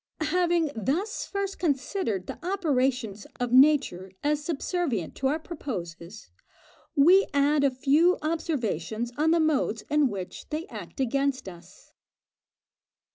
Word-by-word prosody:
Having 345 -4 +2
thus 315 - -2
first 395 -1 -3
considered 275 - -1
the - - -8
operations 260 - -1
of 245 -1 -1
nature 260 -9 +4
as 295 0 +1
subservient 300 - -2
to 265 - -1
our 295 +4 +1
proposes, 210 - -7 0.6
we 355 +7 +6
add 285 +1 +3
a 280 - +5
few 290 +7 +3
observations 240 - -2
on 310 +2 +2
the 335 +1 +4
modes 285 -8 +1
in 300 -1 +4
which 190 -4 -7
they 315 +2 -3
act - - -9
against 275 -1 0
us. 175 0 -13
280 Hz, 125 wpm, -27 LUFS, 225-325 Hz, 0.6 s, we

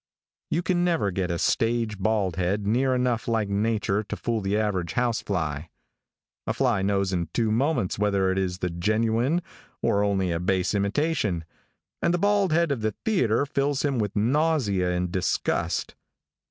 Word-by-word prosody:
You 170 - 0
can 175 -1 +1
never 165 - +1
get 90 0 -2
a 85 - -1
stage 115 +1 0
bald 100 -3 0
head 95 +3 -1
near 130 +5 +2
enough 125 -2 0
like 110 -3 0
nature 105 0 0
to - - -4
fool 115 -2 -2
the 100 +1 0
average 95 -6 -1
house 120 -2 0
fly. 80 -5 -3 0.8
A - - -1
fly 120 -7 +1
knows 100 -1 0
in 85 -3 -1
two 115 -2 +1
moments 120 - 0
whether 100 -2 +2
it 95 - 0
is 90 -2 -1
the 90 -1 -2
genuine, 115 - +1 0.4
or 100 0 +1
only 95 -3 +1
a 85 - -1
base 90 +1 0
imitation, 105 - 0 0.6
and 170 - +2
the - - +1
bald 200 -1 +2
head 170 -1 +2
of 130 -5 -1
the 110 -1 -1
theatre 140 - +2
fills 140 0 0
him 140 -4 0
with 105 -2 -2
nausea 115 - +1
and 90 0 -1
disgust. 90 -1 -1
105 Hz, 170 wpm, -25 LUFS, 95-130 Hz, 0.8 s, near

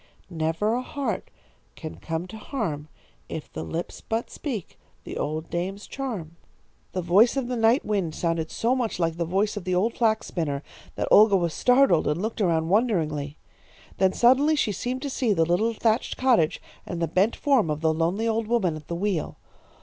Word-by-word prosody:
Never 165 +6 0
a 245 - 0
heart 280 +1 -4 0.5
can 155 -2 -8
come 165 +1 -4
to 220 - -8
harm, 195 - -4 0.4
if - - -7
the - - -4
lips 165 - -5
but 225 +1 -3
speak 235 - -5 0.2
the - - -7
old 155 +2 -3
dame's 190 +4 -3
charm.' 200 - -5 0.6
"The 185 - -2
voice 205 +10 +4
of 265 -3 -1
the 250 - -2
night 230 +4 +3
wind 190 -7 -1
sounded 165 -2 -1
so 240 +3 0
much 245 -4 -1
like 165 -2 0
the 170 - 0
voice 200 +5 +1
of 200 - -4
the 185 0 -1
old 215 +6 +1
flax 220 -2 +1
spinner 145 -5 -3 0.3
that - - -2
Olga 210 -1 +7
was 170 -3 -1
startled 250 - +4
and 150 +3 0
looked 220 +3 -3
around 165 -4 +1
wonderingly. 160 - 0 0.6
Then 190 0 +4
suddenly 270 +6 +4
she 235 -7 +1
seemed 250 - -3
to 285 - -2
see 245 -5 +1
the 165 -4 +2
little 215 +7 +1
thatched 225 +2 0
cottage 240 -12 +3 0.2
and 175 - -5
the 165 - 0
bent 190 +8 +2
form 270 - +2
of 150 0 -2
the 160 -1 +2
lonely 175 +8 0
old 225 -1 0
woman 210 -9 +1
at 150 -1 -10
the 170 - -3
wheel. 185 -2 -2
195 Hz, 190 wpm, -25 LUFS, 165-230 Hz, 0.6 s, Olga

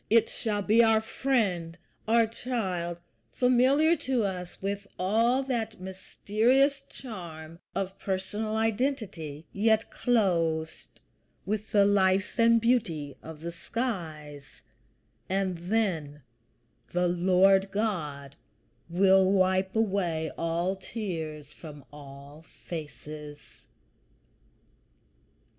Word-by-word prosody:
It 225 0 +4
shall 210 -3 -2
be 220 +4 +5
our 225 -1 +5
friend, 210 -8 -1 0.3
our 230 +1 +5
child, 190 -8 -3 0.4
familiar 260 +6 +4
to 260 -5 0
us 180 -3 -4
with 200 +1 -3
all 230 +8 +2
that 230 -6 -3
mysterious 225 +9 +1
charm 165 -8 -9 0.2
of 195 0 -3
personal 205 +3 -3
identity, 220 - -2
yet 220 +2 +2
clothed 170 -9 0 0.5
with 215 +1 -3
the 200 -1 +5
life 195 +1 +2
and 230 0 +6
beauty 175 - 0
of 160 -1 -10
the 170 +1 -4
skies; 160 - -5 0.7
and 190 -1 0
then 170 -7 -1 0.7
the 180 0 +2
Lord 190 +2 +4
God 150 -10 -3 0.5
will 190 +2 +4
wipe 190 0 +2
away 185 -7 0
all 170 +3 -1
tears 160 -8 -5
from 150 -4 -11
all 140 +1 -12
faces. 150 -2 -10
190 Hz, 95 wpm, -28 LUFS, 165-225 Hz, 0.7 s, and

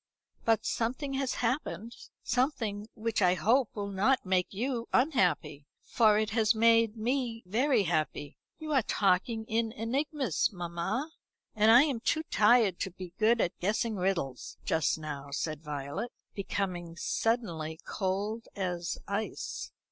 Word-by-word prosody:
But 225 -1 +2
something 255 +5 -1
has 270 -1 -1
happened. 235 -2 -2 0.3
Something 230 -5 -1
which 220 -1 -1
I 180 -1 +4
hope 235 +6 +3
will 200 -1 -3
not 210 +7 +2
make 185 -1 +1
you 235 +3 -2
unhappy 180 - +1 0.2
for 215 -3 +4
it 215 0 0
has 220 0 +3
made 230 0 +4
me 235 0 -1
very 235 +4 +2
happy." 155 -4 -2 0.2
"You 310 -1 -4
are 270 - +5
talking 215 +2 +1
in 225 0 0
enigmas, 260 - 0
mamma, 180 - -3 0.4
and 215 +1 +4
I 240 +4 +9
am 280 -6 -1
too 315 +7 0
tired 215 -4 +4
to 190 - -2
be 180 -1 -10
good 225 +2 +4
at 175 - -1
guessing 215 +4 0
riddles, 180 -9 -2
just 160 -1 +1
now," 145 -3 -6
said 155 +1 -3
Violet, 150 - -4 0.2
becoming 180 -4 -3
suddenly 170 -8 -1
cold 205 +4 -2
as 180 -3 -2
ice. 200 +2 -4
215 Hz, 140 wpm, -30 LUFS, 180-235 Hz, 0.4 s, I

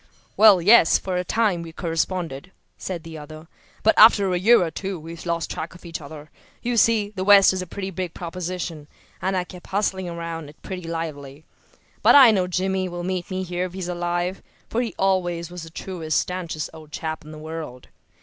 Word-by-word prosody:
"Well, 205 -5 +7
yes, 205 -3 +7
for 185 -1 -4
a 180 - 0
time 200 -2 +1
we 165 -1 -8
corresponded," 165 -1 -3 0.2
said 175 -4 -6
the 165 -1 -9
other. 155 +2 -11 0.4
"But 220 - +5
after 205 -4 +7
a 180 - +1
year 225 +2 +5
or 165 - -3
two 190 -1 -5
we 165 +2 -9
lost 170 0 -3
track 160 +2 -5
of 180 - -15
each 165 -1 -6
other. 150 +1 -11 0.3
You 245 0 -1
see, 215 -2 +3
the 185 - -2
West 200 -1 +7
is 185 - -2
a 185 - -6
pretty 195 +2 -5
big 180 -2 -5
proposition, 175 -3 -5 0.3
and 190 0 0
I 180 - 0
kept 180 0 -13
hustling 190 -2 -1
around 170 -1 -5
over - - -11
it 150 - -18
pretty 180 -3 -6
lively. 155 -3 -6 0.6
But - - +6
I 265 -5 +9
know 185 -4 +1
Jimmy 185 +1 -1
will 175 0 -6
meet 185 +1 -3
me 185 0 -3
here 180 0 -2
if 180 - -8
he's 185 -2 -5
alive, 175 +1 -2 0.3
for 235 - +1
he 230 -7 -4
always 175 -3 0
was 180 -1 -7
the 165 - -9
truest, 165 -2 -2
stanchest 175 -4 -4
old 155 -2 -13
chap 160 0 -4
in 150 - -13
the 155 - -9
world. 155 -5 -8
175 Hz, 205 wpm, -23 LUFS, 165-190 Hz, 0.6 s, I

